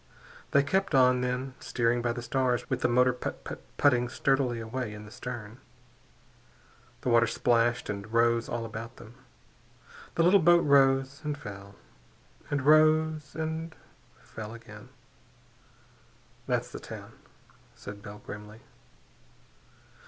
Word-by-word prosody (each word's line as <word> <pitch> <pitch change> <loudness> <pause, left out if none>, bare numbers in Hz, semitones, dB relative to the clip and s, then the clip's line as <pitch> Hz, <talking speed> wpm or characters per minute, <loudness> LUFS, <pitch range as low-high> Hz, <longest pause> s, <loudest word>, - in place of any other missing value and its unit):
They 140 - +4
kept 160 +1 0
on, 125 -1 +5
then, 125 +1 -2
steering 120 0 0
by 120 0 0
the 120 0 -5
stars 125 0 0
with - - 0
the - - +3
motor 125 +1 +4
putt 125 - -6
putt - - -7 0.2
putting 125 -4 +3
sturdily 130 -2 +1
away 115 -1 -4
in 105 0 -10
the 105 - -13
stern. 115 -2 -7 1.4
The - - -1
water 120 0 +5
splashed 120 0 +1
and 100 -1 -5
washed 115 +1 +2
all 120 -1 -3
about 115 +2 -7
them. 110 - -13 1.0
The 165 - +3
little 185 +4 +6
boat 175 0 +5
rose, 135 0 +3
and 150 -1 -2
fell, 100 -5 -10 0.7
and 145 -2 -1
rose 155 0 +4
and 160 0 -4 0.4
fell 110 +2 -9
again. 115 -1 -12 1.6
"That's - - -1
the - - -7
town," - - -9 0.6
said 100 0 -9
Bell 105 +1 -10
grimly. 105 +2 -9
125 Hz, 130 wpm, -29 LUFS, 115-140 Hz, 1.6 s, little